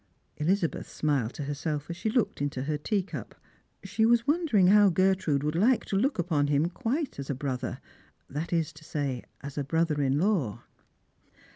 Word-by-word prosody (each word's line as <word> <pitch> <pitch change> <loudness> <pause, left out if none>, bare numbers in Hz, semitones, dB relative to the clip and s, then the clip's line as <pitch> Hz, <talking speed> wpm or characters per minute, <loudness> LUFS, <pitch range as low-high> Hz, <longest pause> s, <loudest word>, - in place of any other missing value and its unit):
'' - - -43
Elizabeth 175 0 0
smiled 140 -7 0
to 145 - -4
herself 145 +1 -3
as 170 - -5
she 220 - -2
looked 225 - 0
into 145 -2 -2
her 150 +2 -1
teacup. 165 - -3 0.5
She 200 +3 0
was 235 +1 +4
wondering 290 - +3
how 205 +2 +7
Gertrude 185 -5 +2
would 150 0 0
like 225 +9 +3
to - - -3
look 265 +9 +1
upon 160 -5 +1
him 145 +3 +2
quite 260 - -2
as 140 - -6
a 140 - 0
brother; 130 -2 -3 0.5
that 150 +4 -4
is 165 -3 0
to 150 - -15
say, 140 -5 -3 0.2
as 140 +1 -6
a - - 0
brother 160 0 +1
in 135 0 +2
law. 160 - 0
160 Hz, 180 wpm, -28 LUFS, 145-195 Hz, 0.5 s, how